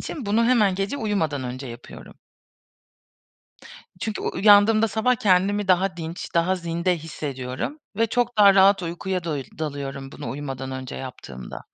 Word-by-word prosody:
için 275 -9 -6
bunu 220 +3 +2
hemen 215 -6 +3
gece 195 +8 -2
uyumadan 160 - -1
önce 130 +2 -6
yapıyorum. 120 0 -11 1.8
Çünkü 215 0 -3
u - - -2
uyandığımda 215 +2 +5
sabah 220 +4 +1
kendimi 200 0 +2
daha 185 0 +2
dinç, 165 +1 -6
daha 170 +3 +2
zinde 170 +1 -1
hissediyorum 140 - -5 0.2
ve 230 0 +2
çok 245 0 -1
daha 200 -1 +8
rahat 195 0 +5
uykuya 175 +1 -3
doyil 145 -5 -3
dalıyorum 140 -3 -5
bunu 145 - -6
uyumadan 135 -2 -5
önce 130 -1 -6
yaptığımda. 65 - -8
180 Hz, 145 wpm, -24 LUFS, 140-205 Hz, 1.8 s, daha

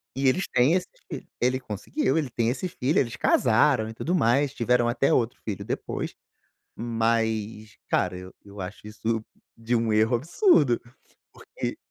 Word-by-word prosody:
e 135 0 +1
eles 180 +8 +2
têm 125 +6 +4
esse 185 - +1 0.2
filho - - -6
ele 130 +1 +2
conseguiu, 125 - -2
ele 145 -5 0
tem 115 -1 0
esse 165 +9 -2
filho, 140 -1 0
eles 120 -4 -1
casaram 110 -1 +3
e - - -7
tudo 165 +10 -1
mais, 135 -1 +2
tiveram 120 -1 +2
até 120 +3 +2
outro 120 -1 +1
filho 105 -4 -4
depois, - - -4 0.6
mas, 110 -2 -1
cara, 90 0 +1
eu 90 0 -10
eu 100 0 -9
acho 95 +3 -8
isso 110 +1 -2 0.3
de 115 +1 -1
um 115 -1 +1
erro 110 +3 +3
absurdo, 150 - +3 0.5
porque - - -6
120 Hz, 160 wpm, -26 LUFS, 110-135 Hz, 0.6 s, têm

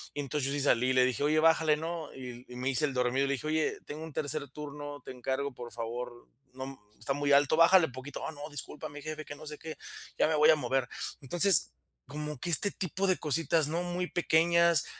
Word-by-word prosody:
Entonces 145 -1 -2
yo 140 - 0
sí 145 - -1
salí 125 -2 +3
y - - +2
le 130 -1 +5
dije: 130 +2 -1
"Oye 155 +1 +3
bájale 160 -1 +4
¿no?". 165 0 -5
Y 125 -1 -9
y 125 - -11
me 125 +2 -2
hice 135 +2 +2
el 140 - -3
dormido 125 +2 +1
y - - -2
le - - +1
dije: 135 +3 -6
"Oye 155 0 0
tengo 155 +2 -7
un 160 - -9
tercer 145 -1 -3
turno, 145 0 -8
te - - -8
encargo 130 +2 -3
por 120 -1 -9
favor, 120 +1 -6 0.3
no 130 +1 -7 0.2
está 115 +6 -4
muy 145 0 -1
alto, 145 +2 +4
bájale 170 +1 +6
poquito". 130 +3 -8
"Oh - - -3
no, 145 0 -8
disculpa 145 0 -6
mi 145 0 -10
jefe", 155 0 -6
que 145 - -8
no 155 +2 -12
sé 150 0 -6
qué, 160 +1 -8 0.4
"ya - - +3
me 160 - +1
voy 150 +1 +5
a 160 - +7
mover". 135 -4 -1 0.3
Entonces 175 +6 +5 0.3
como 150 -1 -5
que 175 - -4
este 200 +5 +4
tipo 190 +1 -2
de 185 - +3
cositas 155 +1 +2
¿no? 170 +3 -1
Muy 180 0 -3
pequeñas, 170 -2 +3
145 Hz, 230 wpm, -30 LUFS, 130-160 Hz, 0.4 s, a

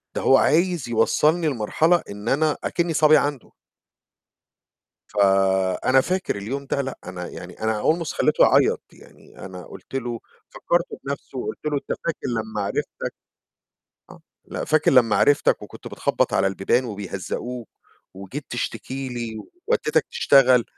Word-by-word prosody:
ده - - -1
هو 135 - +5
عايز 170 -4 +2
يوصّلني 155 +8 +2
لمرحلة 155 +7 +2
إن 105 +2 -5
أنا 150 +2 +2
أكِنّي 170 -1 -1
صبي 155 0 +6
عنده. 145 -3 -2 1.6
فأنا 95 +3 +3
فاكر 185 - -1
اليوم 130 +8 -5
ده 140 - -1
لأ، 135 -1 -4
أنا 90 -1 -6
يعني 90 0 -10
أنا 110 -1 0
almost 165 0 +1
خلّيته - - +3
يعيّط، - - +4
يعني - - -18
أنا 90 -2 -9
قُلت - - -13
له 120 -3 -3 0.3
فكّرته 175 0 -1
بنَفْسه 140 -1 -6
وقُلت - - -4
له: 150 -1 0
"أنت - - -4
فاكر 160 -5 -3
لمّا 110 -2 -3
عرفتك" 100 - -4 1.0
آه، - - -13 0.2
"لأ، - - -5
فاكر 155 0 +3
لمّا 120 -5 +4
عرفتك 145 0 +3
وكنت - - -11
بتخبّط - - 0
على 95 - +3
البيبان 95 +6 +1
وبيهزّقوك 105 +3 -5 0.5
وجيت 100 +10 -8
تشتكي 130 +2 -4
لي 120 -3 -5 0.3
ودّيتك 475 - +1
تشتغل." 130 - +5
125 Hz, 140 wpm, -23 LUFS, 105-150 Hz, 1.6 s, صبي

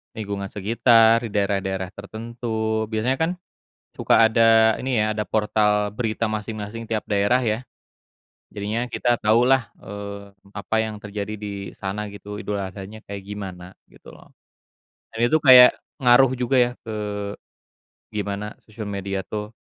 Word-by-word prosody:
lingkungan 100 -2 -4
sekitar, 115 +2 +4
di - - -10
daerah-daerah 95 -2 -1
tertentu 110 +1 -3
biasanya 115 +4 -1
kan 160 +2 +1 0.6
suka 115 - +4
ada 110 0 +5
ini 125 -4 0
ya, 110 - 0
ada 105 - -1
portal 105 -1 +1
berita 110 +1 -3
masing-masing 110 +1 -5
tiap 110 -1 -2
daerah 105 +5 +2
ya. 110 0 0 0.9
Jadinya 105 +4 -2
kita 120 -1 +1
taulah, 120 +2 +3
eee, 100 0 -8 0.2
apa 105 +2 -3
yang 110 -1 -5
terjadi 105 +1 -5
di 100 -1 -6
sana 105 +2 -5
gitu, 100 0 -9
Idul 105 -1 -3
Adhanya 95 +3 -7
kayak 100 -1 -7
gimana 95 -3 -8 0.2
gitu - - -16
loh, - - -17 0.8
dan 110 - -8
itu 155 - +2
kayak 125 -3 +9 0.2
ngaruh 125 0 +5
juga 125 +2 0
ya 120 0 +3
ke 105 -2 -4 1.1
gimana 105 0 -4
sosial 110 -1 -8
media 100 -1 -3
tuh, 105 0 -5
105 Hz, 135 wpm, -23 LUFS, 100-115 Hz, 1.1 s, kayak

